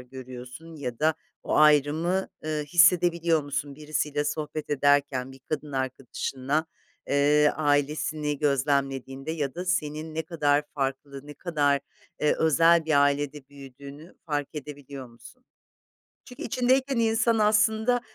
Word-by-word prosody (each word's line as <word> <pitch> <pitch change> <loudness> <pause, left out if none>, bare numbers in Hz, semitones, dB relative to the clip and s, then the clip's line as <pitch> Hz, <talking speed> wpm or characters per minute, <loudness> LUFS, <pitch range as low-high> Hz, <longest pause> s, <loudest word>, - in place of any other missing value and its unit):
görüyorsun 130 +5 -10
ya 125 -5 -5
da 155 +1 +2 0.3
o - - -1
ayrımı, 155 +5 +3 0.2
ııı, 155 -1 -2
hissedebiliyor 170 -1 +4
musun 145 0 -4
birisiyle 150 -1 -2
sohbet 150 +1 -4
ederken 140 -2 +1
bir 135 - -14
kadın 150 -2 -4
arkadaşınla, 135 +3 -2 0.4
eee, 145 +1 +4
ailesini 150 0 0
gözlemlediğinde 135 0 -1
ya 145 -5 -3
da 180 - -5
senin 155 -3 -2
ne 160 - -1
kadar 150 -3 +1
farklı, 140 0 -4
ne 145 - -9
kadar, 145 -5 0 0.4
eee, 150 - +3
özel 165 +1 +4
bir 145 -3 +3
ailede 145 -1 -1
büyüdüğünü 140 +3 -12
fark 145 -2 -2
edebiliyor 140 -2 -8
musun? 185 - -17 0.8
Çünkü 250 - -10
içindeyken 260 +3 +1
insan 225 0 +2
aslında, 220 +3 +3
150 Hz, 120 wpm, -26 LUFS, 140-160 Hz, 0.8 s, hissedebiliyor